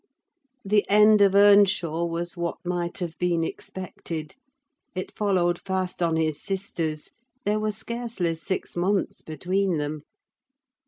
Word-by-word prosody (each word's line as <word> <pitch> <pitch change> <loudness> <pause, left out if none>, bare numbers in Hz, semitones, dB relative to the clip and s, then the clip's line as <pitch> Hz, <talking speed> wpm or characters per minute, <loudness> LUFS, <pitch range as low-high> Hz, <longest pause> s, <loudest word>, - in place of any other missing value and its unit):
The 205 +1 +3
end 210 +1 +6
of 200 -1 +5
Earnshaw 200 -5 +5
was 170 +1 -3
what 170 -1 -3
might 175 -1 -2
have 170 -4 -4
been 175 -2 +1
expected; 165 -3 -6 0.6
it 185 - -5
followed 185 -4 +1
fast 190 -2 -2
on 165 -1 +2
his 155 -2 0
sister's: 170 -6 -3 0.3
there 210 +1 +2
were 215 0 0
scarcely 225 -5 -2
six 165 +3 -4
months 190 +3 0
between 185 +3 -1
them. 150 0 -3
180 Hz, 125 wpm, -25 LUFS, 165-200 Hz, 0.6 s, end